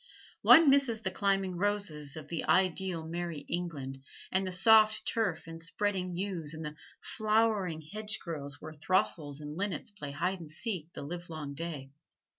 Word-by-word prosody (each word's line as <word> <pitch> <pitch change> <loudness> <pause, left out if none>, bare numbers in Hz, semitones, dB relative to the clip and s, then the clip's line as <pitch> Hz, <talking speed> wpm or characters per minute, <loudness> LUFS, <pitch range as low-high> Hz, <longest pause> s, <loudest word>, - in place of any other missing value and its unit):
One 325 -1 +8
misses 265 -6 +4
the 190 - -2
climbing 195 -2 0
roses 175 -7 -1
of 155 -1 -8
the 165 0 -3
ideal 185 -2 +2
merry 170 -2 -4
England, 140 -7 -4 0.3
and 190 0 +1
the - - -3
soft 215 +3 +5
turf 210 -8 0
and 165 0 -8
spreading 180 +2 -1
yews 175 -5 -3
and 160 0 -6
the 150 0 -6 0.2
flowering 215 -7 +1
hedgerows 165 -7 -5
where 155 0 -8
throstles 150 -3 0
and 150 0 -6
linnets 195 +1 -3
play 150 -8 -7
hide 180 +7 -1
and 165 -3 -9
seek 175 -1 -4
the - - -7
livelong 160 -2 -6
day. 145 -3 -5
175 Hz, 155 wpm, -31 LUFS, 155-200 Hz, 0.3 s, One